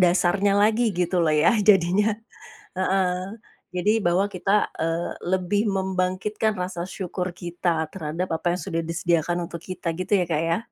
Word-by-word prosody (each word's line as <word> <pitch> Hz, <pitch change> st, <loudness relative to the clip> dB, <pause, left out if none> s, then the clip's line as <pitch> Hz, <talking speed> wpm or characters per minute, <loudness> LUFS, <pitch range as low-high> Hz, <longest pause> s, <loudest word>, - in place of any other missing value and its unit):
dasarnya 185 Hz, +2 st, +3 dB
lagi, 215 Hz, +1 st, +3 dB
gitu 180 Hz, 0 st, +1 dB
loh 155 Hz, -2 st, +2 dB
ya, 150 Hz, +9 st, +4 dB
jadinya, 205 Hz, +1 st, +4 dB, 0.6 s
heeh. 190 Hz, +2 st, 0 dB, 0.3 s
Jadi, 210 Hz, +5 st, +1 dB
bahwa 180 Hz, +3 st, +2 dB
kita, 200 Hz, +1 st, +1 dB, 0.2 s
eee, 165 Hz, +1 st, -1 dB
lebih 185 Hz, +3 st, 0 dB
membangkitkan 190 Hz, +2 st, -1 dB
rasa 180 Hz, -1 st, -3 dB
syukur 185 Hz, 0 st, -4 dB
kita 175 Hz, -2 st, -2 dB
terhadap 165 Hz, 0 st, -3 dB
apa 160 Hz, -, -6 dB
yang -, -, -6 dB
sudah 165 Hz, -3 st, -1 dB
disediakan 170 Hz, +1 st, 0 dB
untuk 170 Hz, -1 st, -8 dB
kita 180 Hz, -3 st, -4 dB
gitu 185 Hz, +4 st, -5 dB
ya, 180 Hz, -, 0 dB
Kak, 160 Hz, -2 st, 0 dB
ya. 165 Hz, +1 st, +1 dB
180 Hz, 150 wpm, -24 LUFS, 170-195 Hz, 0.6 s, ya